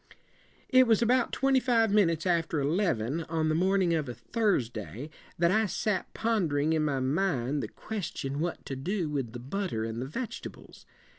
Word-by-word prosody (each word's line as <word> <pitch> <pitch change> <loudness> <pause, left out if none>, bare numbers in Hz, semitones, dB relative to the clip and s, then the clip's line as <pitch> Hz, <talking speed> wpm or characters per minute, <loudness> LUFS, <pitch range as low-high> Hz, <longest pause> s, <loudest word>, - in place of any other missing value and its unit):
"'It 255 -1 +6
was 225 0 +4
about 245 +1 +2
twenty 270 -1 +3
five 230 -4 +2
minutes 170 -6 +3
after 165 -3 +1
eleven, 150 - 0
on 160 -1 0
the - - +2
morning 185 +1 +2
of 155 -5 -1
a 120 - -5
Thursday, 120 - -2 0.3
that 170 +1 +3
I 220 +3 +3
sat 205 +1 -1
pondering 160 -10 +1
in 155 -1 +1
my 140 -3 0
mind 140 -1 0
the - - -3
ques 215 -6 -5
ti - - -5
on 140 +2 -3
what 170 +2 -3
to 135 - -4
do 170 +4 -2
with 135 -6 -3
the 120 - -6
butter 140 - -3
and 115 +1 -4
the 130 - -4
veg 235 - -4
et - - -9
ables. - - -16
165 Hz, 195 wpm, -29 LUFS, 135-205 Hz, 0.3 s, It